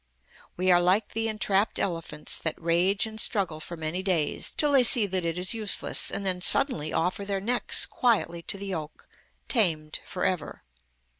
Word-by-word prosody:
We 185 +1 +2
are 175 0 +5
like 185 +5 +2
the 225 0 -2
entrapped 210 -1 0
elephants, 165 -5 -2
that 160 - -4
rage 175 +5 +1
and 220 0 -4
struggle 185 -7 0
for 170 +2 -7
many 160 +3 -3
days, 180 -6 0
till 295 -1 +2
they 275 -2 +6
see 235 -2 +5
that 185 -2 -2
it 165 0 -3
is 185 +3 +1
useless, 215 -3 +2
and 200 - -5
then 180 -1 0
suddenly 165 - +1
offer 180 +4 -2
their 200 -1 -3
necks 240 +5 +2
quietly 210 -9 0
to 195 - -3
the 200 - -6
yoke, 160 -6 -7 0.4
tamed 160 - +1
for 180 - -4
ever. 185 -4 -3
185 Hz, 175 wpm, -26 LUFS, 170-210 Hz, 0.4 s, they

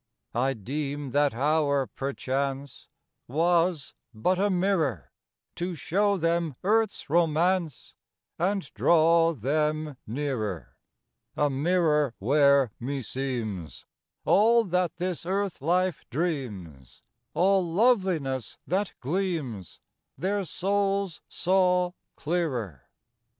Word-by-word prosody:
V 120 - -1
I 135 +2 +2
deem 140 +4 -4
that 145 -3 +2
hour, 140 0 +2
perchance, 135 0 -4 0.4
Was 165 +1 +1 0.2
but 180 +13 +1
a 205 +1 +2
mirror 170 - 0 0.5
To 175 0 -3
show 200 +6 +1
them 165 -3 0
Earth's 220 +2 +1
romance 165 -2 +1 0.5
And 195 +3 +1
draw 165 0 +4
them 150 +2 -1
nearer: 110 - -3 0.6
A 145 -1 +2
mirror 150 -3 +1
where, 140 +1 +4
meseems, 120 - -4 0.4
All 230 +3 +5
that 180 -3 0
this 180 0 -3
Earth 190 -2 -2
life 180 +4 +1
dreams, 115 - -4 0.3
All 190 +1 +3
loveliness 175 - +1
that 190 +2 -1
gleams, 145 - -3 0.4
Their 195 +2 -1
souls 195 -1 -1
saw 180 -1 +2 0.2
clearer. 130 - -3
155 Hz, 95 wpm, -27 LUFS, 135-180 Hz, 0.6 s, All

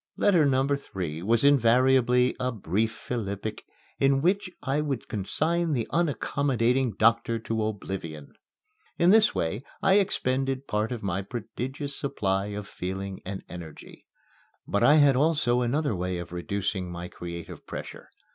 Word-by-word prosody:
Letter 175 -7 +4
number 135 +1 +2
three 85 - -5
was 115 +6 +2
invariably 125 -1 +4
a 125 0 0
brief 110 +1 -1
philippic 110 -3 -5 0.3
in 135 0 +3
which 190 +2 +2
I 135 +3 0
would 140 -5 -3
consign 160 - 0
the 120 -4 -1
unaccommodating 135 -5 +1
doctor 115 +1 +3
to 115 -1 -2
oblivion. 95 -8 -5 0.6
In 175 +2 +5
this 220 0 +5
way 90 +8 -1 0.2
I 195 +2 +5
expended 135 -7 0
part 105 0 -1
of 120 -4 -4
my 95 -1 -1
prodigious 125 +7 -4
supply 100 -8 -1
of 105 -1 -6
feeling 95 +1 -5
and 95 0 -5
energy. 85 -4 -11 0.6
But 100 - 0
I 150 - +6
had 145 -3 +6
also 135 -4 +2
another 135 0 0
way 90 0 -2
of 85 -1 -7
reducing 95 0 -3
my 85 0 -6
creative 85 -1 -8
pressure. - - -8
115 Hz, 140 wpm, -27 LUFS, 100-140 Hz, 0.6 s, I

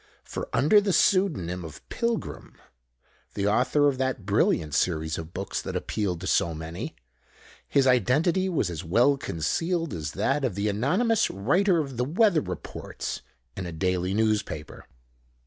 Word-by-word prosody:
For - - -6
under 185 +9 +5
the 200 -2 0
pseudonym 145 - +2
of 80 -2 -10
"Pilgrim" 235 -1 -3 0.8
(the 100 - -1
author 130 +7 +3
of 135 -2 0
that 130 -6 -1
brilliant 85 -6 +1
series 80 -1 0
of 80 0 -8
books 95 +2 -4
that - - -6
appealed 95 -5 -2
to - - -5
so 85 -3 +1
many), 80 +2 -6 0.7
his 140 -1 +3
identity 145 - +3
was 140 - 0
as 85 +1 -5
well 120 +11 +3
concealed 165 - -2
as 75 -3 -4
that 135 +8 0
of 120 -8 -1
the 100 +1 0
anonymous 190 - +2
writer 175 - +2
of 135 -6 -3
the 125 - +1
weather 175 - +3
reports 90 -4 -6 0.3
in 95 -2 -4
a - - -5
daily 90 +2 -1
newspaper. 105 -8 -1
110 Hz, 150 wpm, -26 LUFS, -, 0.8 s, under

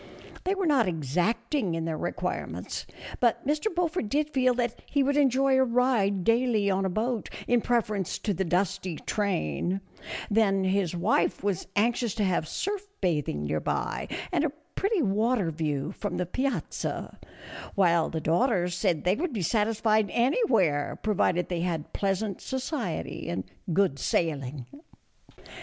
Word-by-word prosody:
They 380 +2 +2
were 390 -1 -1
not 275 - +4
exacting 180 - 0
in 165 0 -2
their 165 -1 -1
requirements, - - -4 0.3
but 240 -2 +2
Mr. 300 +5 0
Beaufort 345 - 0
did 300 +3 0
feel 255 -3 +3
that 240 -1 -1
he 285 -1 +2
would 280 +1 +1
enjoy 270 -1 +4
a - - +6
ride 235 -6 +2
daily 230 -2 +3
on 190 0 +1
a - - +1
boat, 220 +4 -1 0.2
in 240 -1 +3
preference 215 -6 0
to 210 - -1
the 190 - -1
dusty 180 0 0
train; 185 - -1 0.5
then 200 -3 +3
his 190 -2 +1
wife 180 +4 +1
was 200 -4 -1
anxious 230 +1 +1
to 215 - 0
have 180 -5 +1
surf 405 - -3
bathing 150 - 0
near 75 +1 0
by, - - -2 0.2
and - - +2
a 315 - +2 0.2
pretty 395 -4 +1
water 215 -2 +1
view 150 -1 -2
from 205 0 -4
the 180 - 0
piazza; 260 +10 -3 0.6
while 170 -4 +3
the 160 - -2
daughters 180 - +2
said 175 -3 0
they 180 - +3
would 310 - -2
be 205 -6 -2
satisfied 215 +1 +2
anywhere, 230 - +2
provided 180 -4 +2
they 175 -2 -2
had 165 -3 -2
pleasant 195 0 -1
society 260 - -3
and 95 +2 -2 0.3
good 175 -5 +2
sailing. 140 -5 -1
205 Hz, 150 wpm, -28 LUFS, 175-245 Hz, 0.6 s, a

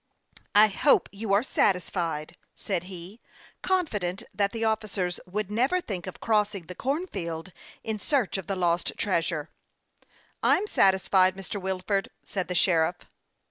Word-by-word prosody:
" - - -17
I 215 +1 +8
hope 280 +8 +3
you 205 +1 -4
are 200 +3 +4
satisfied," 175 - 0 0.2
said 180 -3 -2
he, 185 +4 -10 0.4
confident 210 - 0
that 200 -1 +1
the 225 -1 -2
officers 210 -5 -1
would 210 +2 -3
never 255 +12 +2
think 195 - -5
of 185 - -7
crossing 210 -4 +1
the 180 - -7
corn 280 - -1
field 170 - -5 0.3
in 220 -1 -3
search 240 - 0
of 190 - -8
the 195 - -1
lost 175 -1 +1
treasure. 165 -5 -1 0.5
" - - -34 0.3
I'm 395 - +3
satisfied, 190 - +4
Mr. 195 +1 -6
Wilford," 190 +1 -1
said 190 -3 -3
the 180 - -3
sheriff. 170 -1 +3
195 Hz, 150 wpm, -27 LUFS, 180-215 Hz, 0.5 s, I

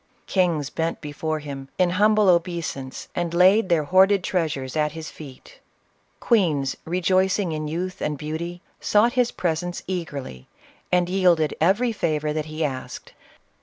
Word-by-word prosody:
Kings 170 -7 0
bent 165 0 -2
before 155 +2 -3
him, 140 -3 -7
in 180 -1 +3
humble 210 +2 +3
obeisance, 170 -7 -1
and 170 -1 -2
laid 190 +3 +5
their 165 -3 +3
CLEOPATRA. 145 - -13
31 - - -18
hoarded 190 +1 +5
treasures 155 -8 -2
at 150 -1 0
his 160 -1 -7
feet 135 -5 -13 0.6
Queens, 160 - +1
rejoicing 185 +2 +1
in 155 -1 -3
youth 180 +4 -4
and 150 -1 -2
beauty, 165 +4 -5 0.2
sought 220 +3 +3
his 250 -2 +2
presence 175 +1 -2
eagerly, 145 - -5 0.4
and 180 -1 +3
yielded 180 -4 +2
every 205 +9 +3
favor 155 -7 -1
that 155 -1 -2
he 155 0 -2
asked. 130 -3 -6
170 Hz, 150 wpm, -23 LUFS, 150-185 Hz, 0.6 s, laid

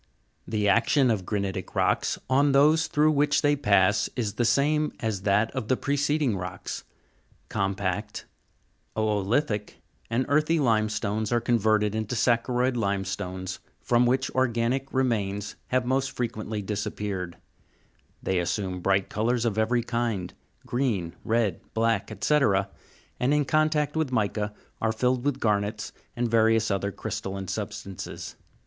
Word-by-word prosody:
The 105 -2 0
action 120 +5 +4
of 95 -5 -2
granitic 100 -3 -3
rocks - - +1
on 140 +2 +3
those 155 +3 +5
through 150 +1 +3
which 145 +1 +2
they 145 0 +4
pass 105 -5 +3
is 110 -5 -1
the 120 - 0
same 150 +5 +2
as 110 -4 -2
that 100 +3 +2
of 130 -5 -4
the 130 - +2
preceding 145 -3 +1
rocks; 90 -1 -5 0.7
compact, 100 +1 -2 0.7
o'olitic, 105 +2 0 0.3
and 120 +3 +1
earthy 155 +3 +2
lime 110 -6 +2
stones 105 0 -2
are 120 - +3
converted 110 -3 +2
into 110 +2 -2
saccharoid 125 +2 +2
limestones, 95 -3 -2 0.2
from 120 0 +3
which 130 +2 +1
organic 130 +1 0
re 130 - +2
mains 105 -4 -1
have 130 -1 +1
most 135 +2 +1
frequently 110 -3 -3
disappeared; 100 -3 -3 0.9
they 95 -1 +1
assume 90 +1 -2
bright 95 +1 +2
colours 120 +2 0
of 110 -3 0
every 120 +2 +2
kind, 115 -6 -2 0.3
green, 115 -10 -1
red, 110 -6 0
black, 115 0 +1
&c., 150 0 +4 0.8
and, 135 +4 +2
in 150 -1 +2
contact 155 0 +1
with 160 -4 0
mica, 105 -2 0 0.3
are 110 - +2
filled 125 +2 0
with 140 -1 0
garnets 105 -1 -1 0.2
and 120 0 0
various 115 -1 +3
other 100 +1 -1
crystalline 95 0 -5
substances. 95 +1 -6
115 Hz, 135 wpm, -26 LUFS, 100-130 Hz, 0.9 s, those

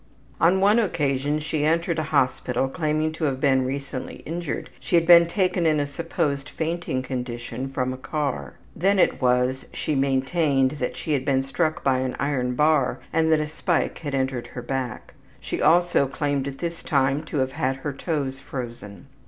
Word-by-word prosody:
On 175 +4 +4
one 205 +4 +5
occasion 145 - 0
she 155 0 -2
entered 165 +1 +1
a 155 0 -3
hospital, 130 -2 +1
claiming 155 +1 0
to 160 0 -3
have 135 -3 -1
been 135 -2 +3
recently 135 -1 -5
injured; 165 -1 -4
she - - -1
had 170 -1 +4
been 170 0 +8
taken 180 -2 +1
in 155 -1 +3
a 145 - +1
supposed 145 -2 -2
fainting 160 -5 -2
condition 125 0 -4
from 130 -1 -1
a - - -7
car. 130 - -3 0.2
Then 195 +4 +2
it 185 - +2
was 125 +1 +1
she 155 - -2
maintained 135 0 +2
that 125 - -2
she 155 - -2
had 135 -3 0
been 135 -1 +1
struck 155 +4 -1
by 130 -2 +2
an 130 -1 -2
iron 125 -3 0
bar 150 -1 +2
and 160 0 +3
that 160 - +4
a 150 - 0
spike 155 +3 -1
had 145 -4 -3
entered 130 -2 -1
her 125 - -8
back. 130 -1 -4 0.3
She - - -4
also 175 -4 +4
claimed 140 0 -1
at 135 -1 -6
this 170 +1 -4
time 135 0 +1
to 155 - -4
have 130 -1 +1
had 130 0 -1
her 140 +2 -4
toes 140 -3 -3
frozen. 120 -5 -7
140 Hz, 185 wpm, -24 LUFS, 130-160 Hz, 0.3 s, been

